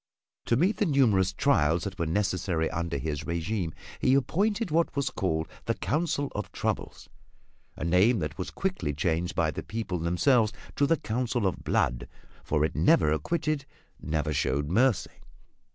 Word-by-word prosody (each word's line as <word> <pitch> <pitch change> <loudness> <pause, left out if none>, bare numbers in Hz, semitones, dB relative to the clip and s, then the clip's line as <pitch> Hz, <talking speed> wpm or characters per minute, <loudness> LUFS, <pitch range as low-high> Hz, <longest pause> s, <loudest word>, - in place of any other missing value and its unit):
To 115 - +2
meet 185 +9 +2
the 205 - +1
numerous 115 - +3
trials 80 +3 +2
that 95 -2 -6
were 85 - 0
necessary 90 -2 0
under 85 -3 -2
his 75 -1 -4
regime 85 +1 -2 0.3
he 130 - +3
appointed 200 - +1
what 165 0 +1
was 140 -2 0
called 80 -4 -1 0.2
the - - 0
Council 150 -2 -1
of 105 -3 -4
Troubles - - -3 0.7
a - - -6
name 95 +8 +4
that 80 -5 -3
was 90 - -4
quickly 185 - -2
changed 85 +3 -1
by - - +2
the - - -5
people 105 -5 -4
themselves 110 - +2 0.2
to 140 - +3
the 165 - +3
Council 120 -2 -1
of 95 - -1
Blood, - - 0 0.4
for 75 0 +1
it - - -4
never 75 - +4
acquitted, 150 - -1 0.3
never 75 0 -1
showed 70 +1 0
mercy. 120 +3 +2
95 Hz, 160 wpm, -28 LUFS, -, 0.7 s, name